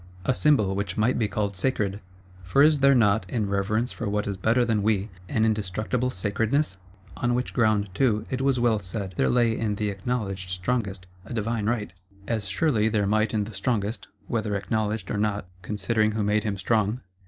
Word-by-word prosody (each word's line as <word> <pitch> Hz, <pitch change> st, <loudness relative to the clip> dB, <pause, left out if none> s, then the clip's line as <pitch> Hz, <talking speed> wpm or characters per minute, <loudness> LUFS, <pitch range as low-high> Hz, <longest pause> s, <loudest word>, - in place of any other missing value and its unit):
A 130 Hz, -, +3 dB
Symbol 125 Hz, -9 st, +3 dB
which 100 Hz, -1 st, -3 dB
might 110 Hz, +4 st, +2 dB
be 110 Hz, -, +2 dB
called 100 Hz, -1 st, -2 dB
sacred; 100 Hz, -1 st, -1 dB, 0.4 s
for 90 Hz, +11 st, +3 dB
is 150 Hz, -1 st, +5 dB
there 140 Hz, 0 st, +5 dB
not, 105 Hz, -5 st, +3 dB
in 110 Hz, -1 st, -1 dB
reverence 105 Hz, +5 st, 0 dB
for 115 Hz, -, -4 dB
what 105 Hz, 0 st, 0 dB
is 100 Hz, -, -2 dB
better 115 Hz, +6 st, +2 dB
than 110 Hz, -3 st, +1 dB
we, 105 Hz, 0 st, +1 dB, 0.2 s
an 110 Hz, -, +2 dB
indestructible 110 Hz, +4 st, 0 dB
sacredness? 105 Hz, +4 st, 0 dB, 0.4 s
On 120 Hz, 0 st, +1 dB
which 125 Hz, +1 st, -2 dB
ground, 110 Hz, -4 st, +2 dB
too, 110 Hz, -1 st, +1 dB
it 130 Hz, 0 st, -1 dB
was 135 Hz, -2 st, +2 dB
well 120 Hz, -3 st, +3 dB
said 95 Hz, 0 st, -5 dB
there -, -, +2 dB
lay 120 Hz, -2 st, +3 dB
in 110 Hz, -2 st, -1 dB
the 105 Hz, 0 st, -1 dB
Acknowledged 95 Hz, -3 st, -3 dB
Strongest 95 Hz, 0 st, -2 dB, 0.2 s
a 120 Hz, -, -7 dB
divine 110 Hz, -1 st, -1 dB
right; 105 Hz, -6 st, -1 dB, 0.3 s
as 110 Hz, -4 st, -1 dB
surely 110 Hz, 0 st, +2 dB
there 105 Hz, -2 st, +1 dB
might 110 Hz, +1 st, +2 dB
in 110 Hz, -2 st, 0 dB
the 110 Hz, +2 st, -8 dB
Strongest, 110 Hz, 0 st, -2 dB, 0.2 s
whether 110 Hz, -4 st, -1 dB
Acknowledged 110 Hz, +1 st, -2 dB
or -, -, -1 dB
not,—considering 105 Hz, +2 st, -1 dB
who 110 Hz, -, -1 dB
it -, -, +1 dB
was -, -, 0 dB
that 105 Hz, -, +1 dB
made 105 Hz, 0 st, +2 dB
him 100 Hz, -2 st, -1 dB
strong. 110 Hz, +4 st, +1 dB
105 Hz, 200 wpm, -26 LUFS, 100-115 Hz, 0.4 s, is